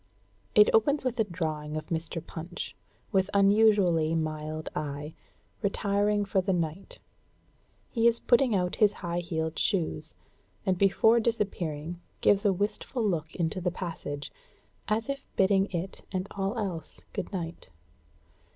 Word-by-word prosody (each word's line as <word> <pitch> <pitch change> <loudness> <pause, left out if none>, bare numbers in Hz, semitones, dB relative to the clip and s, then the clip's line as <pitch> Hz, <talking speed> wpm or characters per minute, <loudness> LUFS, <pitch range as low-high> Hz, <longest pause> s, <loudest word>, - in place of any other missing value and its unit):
It 210 - +7
opens 280 +7 +3
with 250 -2 -1
a - - +5
drawing 155 -4 -3
of 155 - -6
Mr. 165 0 -3
Punch, 170 +1 -6 0.4
with 190 0 +2
unusually 200 -6 +4
mild 155 0 -3
eye, 145 +1 -4 0.5
retiring 205 0 +1
for 195 -1 +1
the 190 +1 0
night; 170 +1 -3 0.9
he 230 -1 +3
is 235 0 +3
putting 240 -2 +3
out 180 -2 0
his 210 -2 +5
high 170 0 -1
heeled 160 -2 -2
shoes, 160 -5 0 0.5
and 190 -2 +3
before 200 +5 +4
disappearing 175 -8 -2 0.2
gives 205 +1 +4
a 200 - +5
wistful 210 +4 -1
look 160 -4 -2
into 170 +1 -1
the 180 - +1
passage, 155 -5 -5 0.6
as 220 +1 0
if 275 0 -4
bidding 195 0 +4
it 180 +1 -4
and 185 0 -2
all 195 +3 -2
else 180 -8 -4
good - - -4
night. 170 -3 -5
185 Hz, 140 wpm, -29 LUFS, 160-205 Hz, 0.9 s, It